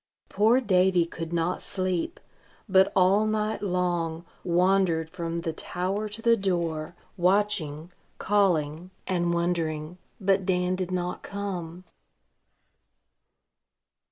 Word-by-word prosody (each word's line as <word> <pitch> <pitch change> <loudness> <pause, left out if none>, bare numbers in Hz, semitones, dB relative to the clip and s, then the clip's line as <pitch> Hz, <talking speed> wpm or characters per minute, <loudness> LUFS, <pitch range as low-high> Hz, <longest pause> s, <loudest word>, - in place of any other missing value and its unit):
Poor 220 +5 +4
Davy 185 -6 +3
could 165 -1 -7
not 170 +1 -1
sleep, 185 - -2 0.5
but 190 -1 +4
all 195 +3 +4
night 215 0 -1
long 175 -3 -1 0.2
wandered 175 -2 +2
from 170 -1 -3
the 165 -2 -3
tower 190 +6 -3
to 220 +2 -7
the 235 0 +5
door, 170 -5 -2 0.2
watching, 180 -4 +1 0.3
calling, 175 -5 +1 0.2
and 175 -2 0
wondering; 170 -1 -1 0.2
but 195 -1 +2
Dan 180 -1 +1
did 185 -1 -3
not 180 -1 -3
come. 185 -4 -5
180 Hz, 105 wpm, -27 LUFS, 170-195 Hz, 0.5 s, the